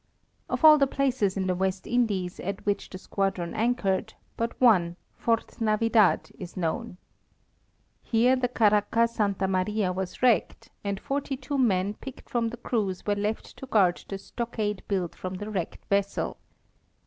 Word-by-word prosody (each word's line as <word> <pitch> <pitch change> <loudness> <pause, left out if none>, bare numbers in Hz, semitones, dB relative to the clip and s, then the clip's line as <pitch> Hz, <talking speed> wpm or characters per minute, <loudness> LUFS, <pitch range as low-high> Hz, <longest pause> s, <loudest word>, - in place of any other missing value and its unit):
Of - - +1
all 305 -1 +9
the 275 - +4
places 255 -8 0
in 190 - 0
the 185 - +1
West 190 +1 -1
Indies 205 -7 0
at 200 +1 -5
which 205 0 -1
the 185 - -7
squadron 190 -2 -2
anchored, 220 -2 0 0.2
but 230 0 -3
one, 185 -9 +4 0.2
Fort 230 0 -1
Navidad, 220 -1 +3
is 180 -1 -8
known. 180 +4 -2 1.0
Here 245 +3 +3
the 255 -1 0
caracca 220 0 +3
Santa 200 -4 0
Maria 190 +1 0
was 185 +4 -5
wrecked, 245 -4 +2
and 200 -1 -2
forty 275 -1 -3
two 280 +1 -3
men 200 -5 +2
picked 265 +4 -11
from 235 -1 +1
the 240 - -8
crews 210 -6 -2
were 205 - +2
left 210 +2 -3
to 265 - -8
guard 190 -7 +3
the 195 - -3
stockade 210 -1 -3
built 185 -4 -1
from 185 0 -6
the 205 +3 -6
wrecked 185 -5 -4
vessel. 200 0 -1
210 Hz, 160 wpm, -27 LUFS, 190-235 Hz, 1.0 s, all